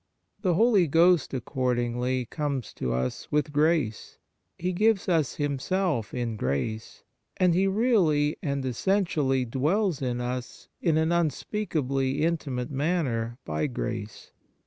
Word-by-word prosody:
The 180 -5 +2
Holy 210 -3 +4
Ghost, 165 +1 +4
accordingly, 125 -1 -1
comes 140 -2 -3
to 65 - -3
us 65 +1 -3
with 150 0 0
grace, 150 -7 +1 0.4
He 180 +2 -2
gives 215 +1 +2
us 160 -7 +1
Himself 145 - -1
in 120 -3 -3
grace, 70 +10 -3 0.3
and 180 -2 +4
He 190 +3 +3
really 190 -9 +2
and 140 -2 -2
essentially 135 - +1
dwells 155 - 0
in 125 -2 -1
us 125 0 -5
in 165 -3 +2
an 160 +1 +2
unspeakably 150 -5 -1
intimate 150 -6 -1
manner 135 -6 -1
by 75 - -1
grace. 115 -4 -5
145 Hz, 125 wpm, -27 LUFS, 125-170 Hz, 0.4 s, Holy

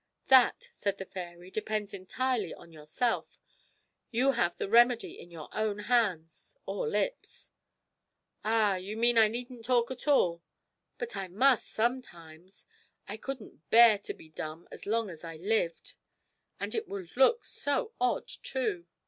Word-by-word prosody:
'That,' 265 - +5
said 200 - -2
the 190 - -6
fairy, 175 -1 -9
'depends 215 -1 -3
entirely 210 +1 -2
on 170 - -15
yourself. 160 +11 -2 0.7
You 250 +4 +3
have 175 -9 0
the - - -3
remedy 235 +2 +4
in 175 - -12
your 165 -3 -9
own 215 -1 -1
hands 210 - -1
or - - -2
lips.' - - -3 0.9
'Ah, 215 -3 +3
you 195 +4 -6
mean 235 0 +4
I 220 - +7
needn't 240 +1 -6
talk 245 0 +2
at 260 +3 -7
all? 175 -12 +3 0.6
But 475 -1 -5
I 190 - -3
must 245 +7 +3
sometimes. 185 -8 -4 0.4
I 205 - -5
couldn't 220 - -8
bear 230 -3 +7
to 205 - -5
be 160 - -16
dumb 155 +1 -7
as - - -10
long 225 +1 +1
as 160 -1 -12
I 165 -1 -7
lived 185 -1 -1 0.7
and - - -3
it 445 -1 -2
would 190 -4 -7
look 360 - +4
so 440 +11 -2
odd, 375 - +1
too!' 215 -10 -3
215 Hz, 150 wpm, -30 LUFS, 180-250 Hz, 0.9 s, I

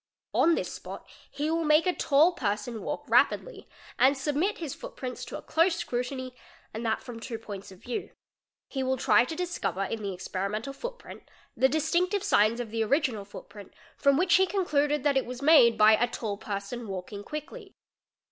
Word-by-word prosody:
On 335 0 +4
this - - -3
spot - - -9 0.2
he 300 +2 -2
will 330 0 0
make 305 +2 +4
a 365 - +2
tall 305 +3 +4
person 215 -2 -3
walk - - -4
rapidly - - +1 0.3
and 270 +2 +5
submit 300 +9 0
his 315 -6 -5
footprints 255 -1 -7
to - - -6
a - - -11
close 335 +2 +2
scrutiny 255 0 -4 0.4
and 220 +2 -5
that 220 -1 -1
from 240 -2 -8
two 230 0 -5
points 200 -3 -9
of 190 - -16
view: 245 - -4 0.6
he 270 - -4
will 260 0 0
try 245 0 +4
to 320 - -5
discover 325 - -2
in 220 +3 -4
the 200 -1 -3
experimental 200 +7 -4
footprint 485 - -9 0.3
the 265 - +4
distinctive 345 +6 +1
signs 215 +3 +3
of 235 -3 -5
the 225 0 0
original 245 -4 0
footprint 205 0 -12 0.2
from 280 -1 +3
which 350 +1 +2
he 380 0 +3
concluded 295 -7 +1
that 280 -2 +3
it 265 - +1
was 250 +2 -7
made 250 -7 +6
by 215 +1 +7
"a 240 +3 +3
tall 220 -3 -4
person 205 +3 -5
walking 195 +1 -6
quickly". 335 - -8
260 Hz, 185 wpm, -28 LUFS, 220-310 Hz, 0.6 s, by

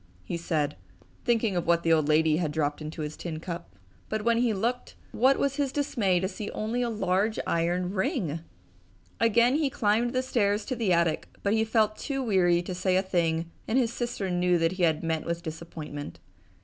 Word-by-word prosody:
he 90 - -4
said, 155 -3 -1 0.5
thinking 230 -4 +2
of 175 - -1
what 170 0 +3
the 165 - +4
old 155 -2 +2
lady 155 0 +4
had 160 -3 -1
dropped 150 -1 -1
into 155 +1 -5
his 150 0 -5
tin 160 -3 -5
cup. 170 - -7 0.3
But 215 -1 -2
when 235 0 +3
he 240 -1 +2
looked, 235 +5 -2 0.2
what 265 +3 +4
was 275 -1 0
his 280 -2 0
dismay 235 -11 +1
to 190 - 0
see 205 +2 -6
only 225 +3 -1
a 240 - 0
large 210 0 0
iron 175 +2 0
ring! 190 - -1 0.8
Again 235 +4 +4
he 300 -3 +1
climbed 230 +1 +1
the 255 0 +1
stairs 210 -4 +1
to 255 - -2
the 225 -5 0
attic 170 -2 +2 0.2
but 200 - +2
he 220 0 +3
felt 220 -1 +1
too 270 -2 -3
weary 180 -6 +3
to 185 - -5
say 185 +1 +1
a 190 - +2
thing 170 -3 0 0.2
and 230 - +1
his 235 -3 +2
sister 235 -6 -3
knew 180 0 +2
that 165 0 +2
he 185 0 -5
had 160 -2 +2
met 160 -1 -1
with 170 0 -3
disappointment. 155 - -7
185 Hz, 200 wpm, -28 LUFS, 165-230 Hz, 0.8 s, the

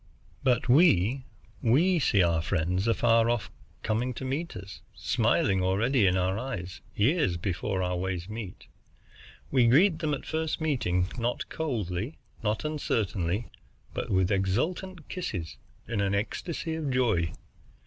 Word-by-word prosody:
But 125 -2 +2
we 130 - +4 0.4
we 165 +10 +3
see 105 - +3
our 85 -1 +2
friends 90 +4 0
afar 115 0 +3
off 120 -2 -1 0.3
coming 120 +3 -1
to 130 - -5
meet 150 +6 -3
us, 95 +1 -9
smiling 95 -1 +2
already 105 +5 +2
in 95 0 +3
our 95 +2 0
eyes, 95 -8 -5
years 125 - +2
before 95 +2 -2
our 90 0 -1
ways 90 -1 -3
meet. 105 -3 -7 0.9
We 125 -3 +4
greet 160 +7 +5
them 155 -3 0
at - - -10
first 160 0 -2
meeting, 105 - 0
not 120 +1 -2
coldly, 115 - -3 0.2
not 110 +5 -1
uncertainly, 110 - -1 0.4
but - - -4
with 95 0 +2
exultant 155 - -1
kisses, 95 - -4 0.3
in 110 -4 -1
an 100 0 +1
ecstasy 160 - -3
of 160 -3 -2
joy. 110 -11 +1
115 Hz, 140 wpm, -28 LUFS, 95-140 Hz, 0.9 s, greet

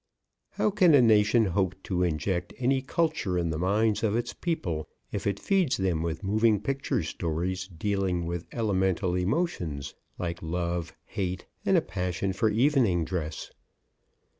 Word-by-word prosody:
How 210 - +1
can 185 -6 +5
a 135 - +7
nation 110 0 +5
hope 95 -1 0
to 90 -2 -1
inject 90 +1 -1
any 130 +1 +2
culture 145 - 0
in 85 -2 0
the 80 - -3
minds 105 +4 +2
of 110 -1 +1
its 120 0 -1
people 85 - -3 0.2
if 100 - -3
it 100 -1 0
feeds 190 -8 +2
them 90 -4 0
with 80 -1 -3
moving 105 +2 +3
picture 135 - -1
stories 85 +4 -2
dealing 95 -1 -1
with 85 0 -4
elemental 95 -5 0
emotions 90 - -1 0.2
like 85 -1 -4
love, 85 0 -2
hate, 95 -2 -3 0.2
and - - +5
a - - +4
passion 90 +1 -2
for 110 +3 +2
evening 115 - +3
dress? 80 -4 -4
95 Hz, 150 wpm, -28 LUFS, 85-115 Hz, 0.2 s, a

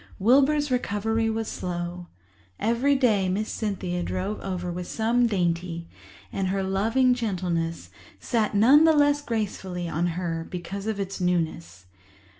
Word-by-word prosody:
Wilbur's 280 +6 +3
recovery 225 -1 0
was 220 0 -2
slow. 175 0 -4 0.5
Every 235 +6 +2
day 215 -8 +2
Miss 210 +4 -1
Cynthia 185 -5 -2
drove 190 +4 -3
over 180 -2 -4
with 180 0 -5
some 235 +2 +2
dainty, 170 -4 -1 0.5
and 190 - -1
her 195 +1 0
loving 225 +7 +2
gentleness 180 -8 -2 0.3
sat 220 -4 0
none 265 +10 +7
the 320 - +6
less 290 0 +3
gracefully 190 -7 -3
on 165 +2 0
her 165 -2 -3
because 190 +3 -6
of 220 -2 -2
its 195 -1 -4
newness. 165 - -2
195 Hz, 135 wpm, -25 LUFS, 180-230 Hz, 0.5 s, none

